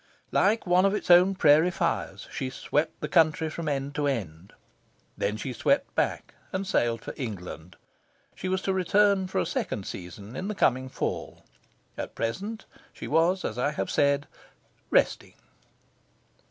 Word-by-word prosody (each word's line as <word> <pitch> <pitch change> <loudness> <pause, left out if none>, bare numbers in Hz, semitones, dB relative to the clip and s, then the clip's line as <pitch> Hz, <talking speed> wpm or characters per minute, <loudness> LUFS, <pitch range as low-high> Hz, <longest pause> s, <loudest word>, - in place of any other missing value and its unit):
Like 215 +4 +2
one 180 +1 +4
of 195 +1 +3
its 195 - 0
own 180 +2 +7
prairie 160 0 +5
fires, 170 - -2
she 130 - -3
swept 150 +3 -2
the 150 - -2
country 155 0 +3
from 165 -1 -3
end 140 0 -2
to 145 0 0
end. 95 - -4 0.6
Then 105 +2 -1
she 125 +3 -4
swept - - +1
back, - - -1 0.2
and 190 +1 -2
sailed 120 -10 +1
for - - -7
England. 90 - -6 0.6
She 185 - -5
was 190 0 -1
to 195 - 0
return 190 +1 +3
for 185 - -4
a - - +2
second 190 - -3
season 100 +6 -8
in 185 - -4
the 215 - -3
coming 130 -6 +2
Fall. - - -4 0.6
At - - -5
present, 200 - -3 0.3
she - - -8
was, 170 +5 +2
as 110 - -3
I 145 +4 +1
have - - -3
said, 140 0 +2 0.6
"resting." - - +1
150 Hz, 160 wpm, -27 LUFS, 125-185 Hz, 0.6 s, own